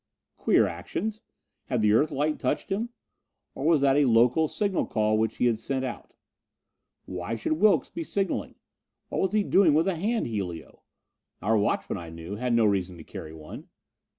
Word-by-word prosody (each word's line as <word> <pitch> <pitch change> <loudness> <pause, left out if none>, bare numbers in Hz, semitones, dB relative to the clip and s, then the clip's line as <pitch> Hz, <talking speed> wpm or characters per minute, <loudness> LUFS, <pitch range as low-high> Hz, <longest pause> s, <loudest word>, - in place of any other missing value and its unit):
Queer - - +3
actions! 220 0 -4 0.4
Had 125 -3 -1
the 105 0 +4
Earthlight 150 +4 +1
touched 130 - -2
him? 220 +5 -1 0.6
Or - - -6
was 160 -4 +4
that 140 0 +4
a 145 - +4
local 125 +6 +4
signal 200 +2 -1
call 110 -1 +1
which 110 0 0
he - - +1
had 115 -3 +2
sent 130 +2 -2
out? 125 - -7 0.9
Why 90 +4 -4
should 115 - -1
Wilks 200 +6 +3
be 335 - -4
signalling? 200 - -2 0.5
What - - -1
was 190 - 0
he 215 -1 +3
doing 185 -7 +4
with 160 +4 +3
a 190 - +1
hand 220 +7 0
helio? 95 -8 -5 0.6
Our 110 +3 +2
watchmen, 105 -3 0
I 85 -1 -8
knew, 85 +4 -7
had 125 +1 -1
no 115 -1 +4
reason 95 -3 0
to 80 - -10
carry 80 - -8
one. 75 -1 -10
125 Hz, 180 wpm, -27 LUFS, 105-165 Hz, 0.9 s, the